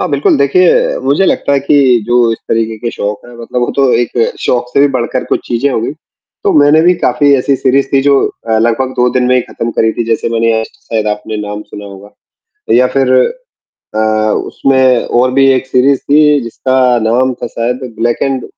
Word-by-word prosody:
हाँ, - - -1
बिल्कुल 140 0 +1
देखिए 170 +6 +2
मुझे 145 +8 +2
लगता 140 - 0
है 140 - +3
कि 140 +2 0 0.3
जो 120 -1 +2
इस - - -5
तरीक़े 115 -1 -1
के 120 +1 -4
शौक 105 +3 -5
हैं 120 - -14
मतलब 125 +1 -4
वो 120 - -1
तो 135 -2 +2
एक 120 0 0 0.3
शौक 125 0 -1
से - - +2
भी 145 - +5
बढ़कर 125 0 -2
कुछ - - -2
चीज़ें 125 +4 0
हो 115 - -1
गई 120 - -3 0.5
तो - - +2
मैंने 145 +2 +4
भी 180 +1 +4
काफ़ी 140 +3 +2
ऐसी 135 +1 0
सीरीज़ 135 +1 +1
थी 135 - +3
जो 140 0 +3 0.3
अ, 110 - +2
लगभग 120 +3 0
2 125 0 +2
दिन 125 -1 +1
में 125 - +3
ही 125 - +3
ख़त्म 115 0 -5
करी 110 -1 0
थी 120 - -3
जैसे 115 0 -1
मैंने 115 -1 0
शायद 110 -2 -4
आपने 105 +1 -4
नाम 105 +1 -6
सुना 105 -1 -11
होगा 100 +1 -12 0.7
या 125 - +4
फिर 130 -1 +2 0.8
अ, - - 0 0.5
उसमें 130 -2 +1
और 125 +1 +1
भी 135 0 +3
एक 130 0 -1
सीरीज़ 130 +1 +2
थी 150 0 +4
जिसका 130 +3 -3 0.3
नाम 130 +2 +1
था - - -2
शायद 125 +1 -4
ब्लैक 120 +1 -1
एंड 135 -3 -1
125 Hz, 205 wpm, -12 LUFS, 115-135 Hz, 0.8 s, भी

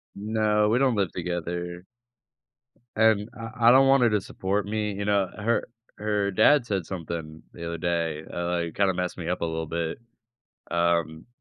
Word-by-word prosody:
No, 105 0 +1
we 115 - +3
don't 130 -4 +3
live 95 -5 0
together. 85 0 -4 1.1
And 110 -1 +3
I 115 +1 -1
I - - +10
don't 135 +1 +6
want 135 -2 +5
her 120 - +5
to 105 -2 +2
support 100 +2 -2
me, 105 -1 -2
you 100 +1 -4
know? 100 -2 +2
Her 115 +3 +1 0.3
her 105 -1 0
dad 140 +6 +5
said 95 -7 -2
something 80 -3 -6
the 85 - -7
other 85 0 -4
day, 85 -3 -1
uh, 85 0 -2
like, 85 -2 -2
kinda 100 -2 +2
messed 90 0 -3
me 85 -1 -4
up 90 - -2
a - - +1
little 80 -1 -3
bit, 85 +2 -3 0.7
um, 85 -1 0
95 Hz, 180 wpm, -26 LUFS, 85-105 Hz, 1.1 s, I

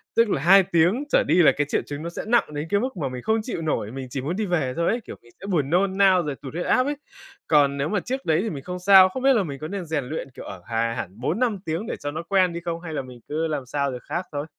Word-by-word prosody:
tức 230 -2 +4
là 135 - 0
2 190 +4 +7
tiếng 175 - +2
trở - - +4
đi 175 - +4
là - - +7
cái 145 -1 0
triệu - - +1
chứng 145 +2 -6
nó 170 - -4
sẽ - - -6
nặng 235 -10 +2
đến 150 +2 -4
cái 200 - +2
mức 255 -4 -3
mà 140 -5 -2
mình 125 -1 -6
không 220 0 +1
chịu 215 -9 -4
nổi, 135 -9 -2
mình 130 0 -6
chỉ 130 +1 -4
muốn 160 +7 -3
đi 215 0 -1
về 155 -8 0
thôi 170 - +1
ấy, 235 +1 0
kiểu, - - -8
mình 120 - -20
sẽ - - -8
buồn 150 -8 0
nôn 190 +3 +1
nao 190 -3 +5
rồi 145 -2 -3
tụt 135 +1 -10
huyết 175 - -3
áp 255 +1 +3
ấy. 290 +1 -1 0.5
Còn 140 -2 +3
nếu 140 +2 -1
mà 205 -2 +1
trước 260 +7 -4
đấy 160 +2 +2
thì 225 - -2
mình 140 -4 -6
không 180 0 -5
sao, 190 0 +7
không 260 +7 -6
biết 270 0 +6
là 215 -5 +2
mình 140 -5 -6
có 155 - -5
nên 195 -2 -5
rèn 155 -4 -2
luyện, 145 0 -5
kiểu, - - -10
ở 95 -2 -8
hà 115 0 -1
hẳn 95 0 -6
4,5 220 - 0
tiếng 165 +8 -3
để - - -3
cho 145 0 -4
nó 160 +3 -5
quen 185 -3 +3
đi 170 - -4
không? 170 0 -4
Hay 160 -3 -7
là 140 - -2
mình 125 -2 -12
cứ 160 +2 -1
làm 145 -4 -3
sao 140 +1 -1
được 125 - -7
khác 180 +1 -4
thôi? 145 +1 -3
165 Hz, 315 wpm, -24 LUFS, 140-195 Hz, 0.5 s, 2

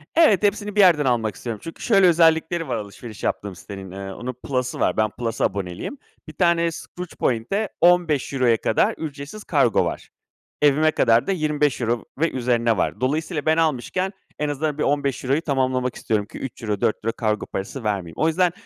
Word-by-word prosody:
Evet, 270 - +5
hepsini 205 0 0
bir - - +1
yerden 170 -7 +6
almak 115 -5 +1
istiyorum. 115 -3 -5
Çünkü 165 - -9
şöyle 195 -5 +5
özellikleri 165 0 +3
var, - - -1
alışveriş 105 +1 -8
yaptığım 100 -2 -2
sitenin, 95 0 -9
eee, 95 0 -6
onun 125 +5 -5
plus'ı 125 0 -3
var. - - +1
Ben 110 0 +2
plus’a 115 +1 -2
aboneliyim. 95 - -4 0.3
1 155 - -9
tane 170 0 +2
Skroutz 180 +2 -8
point’e 130 - -1
€15’ya 150 -8 +3
kadar 110 - +1
ücretsiz 150 +6 -7
kargo 135 - +2
var. - - -5 0.5
Evime 150 +2 +4
kadar 115 -5 +3
da - - +1
€25 150 - 0
ve 165 +1 +2
üzerine 120 -3 +1
var. - - -1
Dolayısıyla 150 +4 -1
ben 160 0 +3
almışken 165 +5 0 0.3
en 150 0 0
azından 145 +1 -2
bir - - 0
€15’yu 140 0 0
tamamlamak 130 -4 0
istiyorum 105 -2 -1
ki - - -11
€3 110 -6 -4
€4 115 +1 0
kargo 110 -2 0
parası 100 +7 -5
vermeyeyim. 95 -6 -2
O 160 - +2
yüzden, 175 +2 +2
140 Hz, 170 wpm, -23 LUFS, 115-165 Hz, 0.5 s, yerden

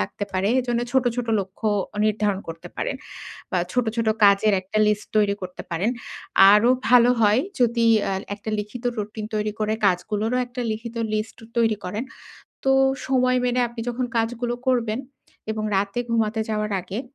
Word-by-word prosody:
লাগতে 100 - -3
পারে। 190 +2 +1
এজন্য 240 -1 -1
ছোট, 260 -1 +3
ছোট 245 - -2
লক্ষ্য 195 +3 -4 0.4
নির্ধারণ 210 -2 +1
করতে 165 0 -8
পারেন। - - -2 0.5
বা 185 - +1
ছোট, 250 -1 +1
ছোট 230 -1 +1 0.2
কাজের 200 +1 +5
একটা 195 +3 -3
লিস্ট 210 0 0
তৈরি 205 -1 +3
করতে 180 0 -6
পারেন। 175 +7 0 0.6
আরো 210 +4 +5 0.2
ভালো 245 0 +6
হয় 215 +2 +4 0.2
যদি 235 -1 +3 0.2
অ্যা 195 - -1 0.2
একটা 215 +1 -6
লিখিত 210 +4 -6
রুটিন 210 +1 -4
তৈরি 210 0 -1
করে 215 +1 +1
কাজগুলোরও 210 +6 0
একটা 250 +1 -7
লিখিত 230 +2 -7 0.2
লিস্ট 215 +1 -3 0.2
তৈরি 225 -2 +3
করেন। 210 +7 -3 0.6
তো 270 - +3 0.4
সময় 255 -1 +2
মেনে 250 0 +1
আপনি 235 0 -8
যখন 245 +1 -2
কাজগুলো 240 +1 -1
করবেন। 235 -2 +1 0.5
এবং 215 0 -3
রাতে 200 +4 -1
ঘুমাতে 225 -1 +1
যাওয়ার 210 -1 -1
আগে, 190 +5 -5
215 Hz, 160 wpm, -23 LUFS, 205-240 Hz, 0.6 s, ভালো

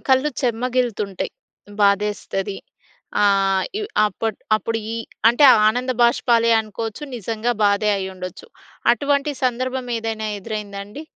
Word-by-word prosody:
కళ్ళు 265 +3 +3
చెమ్మగిల్లుతుంటాయి. 240 -5 -1 0.5
బాధేస్తది. 200 -1 0 0.7
ఆహ్, 195 -1 +3 0.2
ఇవ్ 420 - -4 0.2
అప్పట్ 220 0 -3 0.2
అప్పుడుయీ 225 +1 -3 0.3
అంటే, 240 +5 +4 0.2
ఆనంద 250 +4 -1
భాష్పాలే 235 -1 +3
అనుకోచ్చు. 220 +4 -6
నిజంగా 225 +2 -2
బాధే 205 +1 +3
అయ్యుండొచ్చు. 185 - -7 0.4
అటువంటి 280 +4 0
సందర్భమేదైనా 240 -3 -2
ఎదురైందాండి? 205 +3 -6
225 Hz, 90 wpm, -21 LUFS, 200-245 Hz, 0.7 s, అంటే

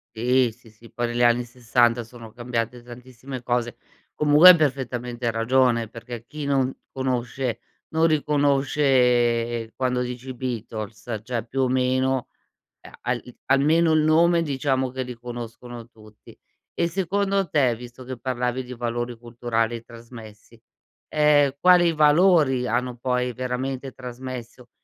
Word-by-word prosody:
Sì, 125 +2 +2
sì, 115 +1 -20
sì 110 +2 -18
poi 120 0 -2
negli 120 +1 0
anni 120 0 +3
60 120 -1 +1
sono 115 -1 -13
cambiate 120 0 -4
tantissime 125 +1 -9
cose. 120 -1 -1 0.4
Comunque 150 +4 +7
hai 180 - +9
perfettamente 125 -4 -2
ragione 115 0 +2
perché 115 +1 -9
chi 150 +2 -7
non 135 -2 +1 0.2
conosce, 130 -1 -2 0.3
non 160 +1 +3
riconosce, 135 -6 +2
quando 125 -1 -1
dici: 125 +1 -6
"I 130 - -5
Beatles" 110 -3 -5
cioè 115 -2 -3
più 135 +3 -2
o 130 - +2
meno, 130 0 +1 0.5
ehm, - - -14
al 125 -1 -2 0.2
almeno 155 +5 +3
il 155 - +4
nome 165 +2 +4
diciamo 135 -3 -1
che 130 +1 -4
li 125 0 -7
conoscono 120 0 -9
tutti. 110 -2 -17 0.4
E 170 - 0
secondo 195 +2 0
te, 135 -6 +2
visto 120 +2 -11
che 130 0 -7
parlavi 125 0 -2
di 125 0 -9
valori 120 0 -3
culturali 115 -1 -2
trasmessi, 115 -1 -13 0.5
ehm, 150 -2 +3
quali 175 -1 +5
valori 150 -4 +4
hanno 125 +2 -1
poi 125 0 -1
veramente 130 +2 -4
trasmesso 125 -1 -9
125 Hz, 135 wpm, -24 LUFS, 120-135 Hz, 0.5 s, hai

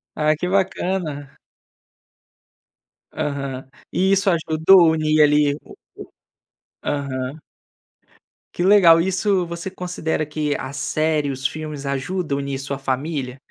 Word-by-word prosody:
Ah, 155 0 +2
que 180 - -3
bacana. 180 -6 -2 1.7
Aham, 140 -3 -4 0.2
e 190 +1 +1
isso 195 0 +3
ajudou 165 +1 +5
unir, 155 -1 +2
ali, 150 -1 +3
o - - -17 1.1
o - - -13
aham. 140 -1 -3 1.2
Que 175 - -2
legal! 185 -4 +7
Isso 190 +1 +1
você 170 +2 -6
considera 180 -4 -3
que 150 -1 -2
a 130 +1 -6
série, 150 +1 0
os 135 0 -5
filmes 150 -2 -7
ajudam 140 +2 -2
unir 140 -1 -3
sua 140 0 -4
família? 135 -1 -3
155 Hz, 115 wpm, -21 LUFS, 140-175 Hz, 1.7 s, legal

